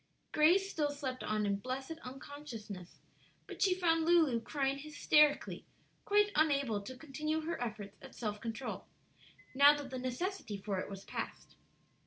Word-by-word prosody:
Grace 350 +6 +5
still 305 -6 0
slept 275 -3 -4
on 215 0 0
in 200 -1 +1
blessed 265 +8 -5
unconsciousness; 250 - -8 0.5
but - - -9
she 380 -3 +4
found 330 -3 +2
Lulu 320 -8 +4
crying 275 +2 -1
hysterically, 300 0 +2 0.4
quite 415 0 +4
unable 280 -8 +2
to 255 +6 -8
continue 305 +2 -2
her 325 -3 -4
efforts 210 -4 -6
at 270 - -12
self 210 -3 -3
control, 230 +3 -5 0.7
now 285 +2 +7
that 280 -2 -7
the 260 - -3
necessity 255 - -3
for 195 -1 -3
it - - -4
was 195 -1 -8
past. - - -6
275 Hz, 150 wpm, -34 LUFS, 225-310 Hz, 0.7 s, now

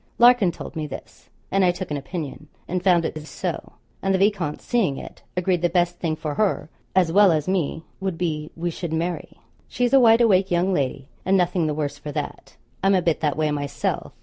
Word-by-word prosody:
Larkin 240 -6 +6
told - - -9
me 155 -1 -3
this 140 - -10 0.2
and 195 0 +3
I 180 - +5
took 175 -1 -3
an - - 0
opinion 155 0 -6 0.2
and 180 0 -2
found 175 -3 +4
it - - -3
is 155 0 -8
so; - - -4 0.3
and 195 - 0
the 190 - +3
viscount 190 -6 +1
seeing 200 - 0
it, - - -10 0.2
agreed 180 -1 +1
the 175 - +2
best 175 0 +1
thing 160 -3 -1
for 155 -1 -4
her 200 -4 0 0.2
as 180 -3 +4
well 200 +1 +6
as 155 -1 0
me 170 -4 -1 0.2
would 190 -3 -2
be, 155 -3 -2
we 170 +1 -2
should 165 0 -5
marry. 170 +2 -3 0.3
She 245 - 0
is 245 - 0
a 270 - +8
wide 230 -1 +6
awake 195 -4 +4
young 180 +2 +2
lady, 135 -3 -1 0.2
and 195 +1 +3
nothing 180 -2 +1
the 150 - -1
worse 145 -2 -3
for 150 - -6
that: - - -6 0.3
I'm 195 0 +4
a 185 - +3
bit 165 -2 +1
that 150 -3 0
way 155 -1 +1
myself. 145 -1 -2
175 Hz, 225 wpm, -23 LUFS, 155-190 Hz, 0.3 s, a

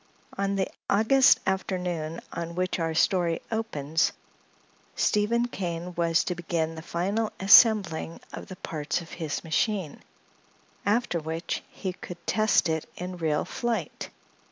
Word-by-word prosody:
On 200 0 0
the 190 -1 0 0.2
August 225 +6 +5
afternoon 180 -4 -2
on 170 0 -5
which 185 0 -1
our 165 -1 -1
story 170 -1 +2
opens 165 -9 0 0.8
Stephen 235 +3 +2
Kane 175 -5 -4
was 170 -1 +2
to 180 - -2
begin 165 -2 -2
the 160 - -8
final 200 +7 -1
assembling 195 -5 +5
of - - -7
the 185 - -8
parts 155 -2 -3
of 165 - -12
his 160 -4 -4
machine, 175 0 -1 0.9
after 210 -4 +1
which 160 +2 -3
he 185 -2 -5
could 175 -1 -10
test 215 -4 +3
it 160 -1 -2
in 180 0 -6
real 155 -3 0
flight. 240 -2 -3
180 Hz, 130 wpm, -27 LUFS, 165-200 Hz, 0.9 s, August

